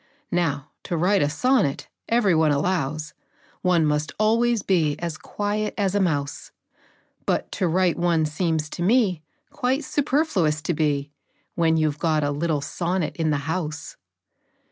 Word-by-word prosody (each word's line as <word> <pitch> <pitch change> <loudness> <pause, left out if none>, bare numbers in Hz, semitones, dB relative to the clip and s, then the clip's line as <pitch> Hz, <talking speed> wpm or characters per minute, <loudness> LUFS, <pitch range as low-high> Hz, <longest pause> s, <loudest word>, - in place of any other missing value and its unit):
Now, 150 -4 -1
to 170 - -2
write 185 +4 +3
a 145 - +2
sonnet, 150 - +1 0.2
every 230 -5 +3
one 160 -1 +3
allows, 150 -1 -1 0.5
One 175 -3 +3
must 150 0 0
always 230 +1 +2
be 160 -6 +1
as 170 -1 -4
quiet 210 +4 -3
as 195 -3 +1
a 205 - +2
mouse; 145 -7 -1 0.8
But - - 0
to 185 - 0
write 180 +1 +2
one 170 -2 +2
seems 155 0 -1
to - - -6
me 195 -4 +2 0.3
Quite 260 +4 0
superfluous 265 - +1
to 175 - 0
be, 145 -2 0 0.4
When 165 -1 +2
you 155 -1 +2
've 145 - -13
got 155 -3 +1
a 145 - 0
little 150 0 -1
sonnet 170 +3 -2
in 160 -2 0
the 150 - +2
house. 160 -2 -4
165 Hz, 155 wpm, -24 LUFS, 150-195 Hz, 0.8 s, write